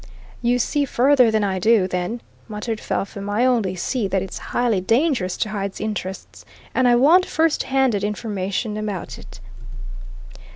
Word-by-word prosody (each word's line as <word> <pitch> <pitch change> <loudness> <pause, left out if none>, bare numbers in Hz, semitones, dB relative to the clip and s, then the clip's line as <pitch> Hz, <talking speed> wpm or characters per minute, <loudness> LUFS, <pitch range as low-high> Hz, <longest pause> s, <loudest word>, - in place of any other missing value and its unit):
"You 245 +1 +2
see 285 +4 0
further 260 -1 +4
than 220 -1 +1
I 190 -2 -1
do, 215 -1 +3
then," 180 +6 -3 0.3
muttered 215 0 -4
Felpham. 200 0 -4
"I 215 +5 +1
only 225 -8 +1
see 220 +4 -2
that 190 -1 0
it's 190 - -7
highly 235 -6 +1
dangerous 225 - +1
to 215 - -1
Hyde's 200 -2 -4
interests. 200 -3 -5 0.3
And 260 -1 +3
I 240 - +5
want 310 +9 +5
first 320 -1 +1
handed 265 -7 +2
information 210 0 -3
about 210 -4 -5
it." - - -13
215 Hz, 155 wpm, -21 LUFS, 195-245 Hz, 0.3 s, I